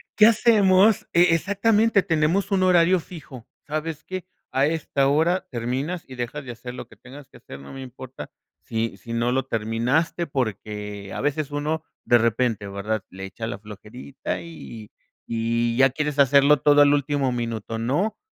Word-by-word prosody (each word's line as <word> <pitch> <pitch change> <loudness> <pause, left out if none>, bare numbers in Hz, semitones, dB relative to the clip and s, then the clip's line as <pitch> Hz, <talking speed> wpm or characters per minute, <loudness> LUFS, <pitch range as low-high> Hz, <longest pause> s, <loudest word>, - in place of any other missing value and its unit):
¿Qué 215 - +7
hacemos? 210 -2 +4
E 170 -1 +5
exactamente, 205 +3 +2
tenemos 165 +5 +1
un 190 -1 +2
horario 180 0 +4
fijo. 150 -8 -11 0.2
¿Sabes 155 +1 -4
qué? 185 -1 -6 0.3
A 135 +1 +2
esta 150 -3 0
hora 165 +6 +2
terminas 130 +8 -3
y 130 - -10
dejas 125 +4 -5
de 130 - -7
hacer 120 +1 -8
lo 125 - -8
que - - -18
tengas 135 +2 -13
que - - -16
hacer, 70 - -11
no 70 - -12
me 135 - -8
importa, 130 0 -9 0.3
si 115 -2 -3
si 115 +4 -8
no 120 +1 0
lo 130 0 0
terminaste, 125 +9 -1
porque 105 -5 -4
a - - -4
veces 145 +1 -1
uno 155 +2 -2 0.2
de 120 - +5
repente, 115 -2 0
¿verdad?, 100 +1 -3
le 95 +1 -7
echa 95 +4 -7
la 110 - -5
flojerita, 105 +6 -7
y 120 -10 -10 0.4
y 115 +1 0
ya 135 0 +5
quieres 150 +1 -2
hacerlo 140 +1 +5
todo 145 +2 +5
al 145 0 +6
último 145 -2 0
minuto, 115 -2 -4
¿no? 150 - -1
135 Hz, 170 wpm, -23 LUFS, 115-160 Hz, 0.4 s, Qué